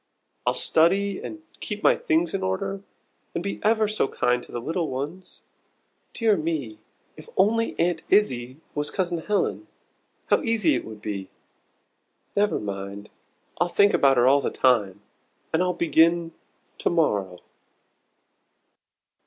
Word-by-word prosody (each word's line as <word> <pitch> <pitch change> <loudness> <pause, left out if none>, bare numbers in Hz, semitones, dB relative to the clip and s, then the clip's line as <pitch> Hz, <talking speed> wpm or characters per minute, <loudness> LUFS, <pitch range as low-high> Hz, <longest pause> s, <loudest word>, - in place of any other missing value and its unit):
I'll - - +3
study, 195 +4 +2
and 320 0 -8 0.2
keep 210 -1 -5
my - - +6
things 160 +1 0
in 195 - -1
order, 145 - -2 0.5
and 170 - -2
be 200 - -4
ever 220 0 +3
so 215 -8 0
kind 125 -2 0
to - - -14
the 120 - -4
little 160 +6 -2
ones. 145 +8 -6 0.7
Dear 225 -3 +3
me 155 - -3 0.4
if 155 - -13
only 225 +4 +2
Aunt 170 -1 +1
Izzie 130 -10 +2 0.2
was 145 0 -1
Cousin 175 -3 -1
Helen, 210 - -1 0.6
how - - +2
easy 230 +6 +2
it - - -2
would 110 -1 -10
be! 100 -3 -4 1.1
Never 205 +1 +2
mind 100 0 -6 0.5
I'll 175 - +3
think 200 +3 +3
about 135 -2 +4
her 120 - +5
all 140 +2 +5
the - - -1
time, 105 -7 +1 0.5
and 160 - +2
I'll 180 0 +2
begin 170 0 +2 0.5
to - - +1
morrow." 100 - 0
165 Hz, 140 wpm, -25 LUFS, 125-195 Hz, 1.1 s, my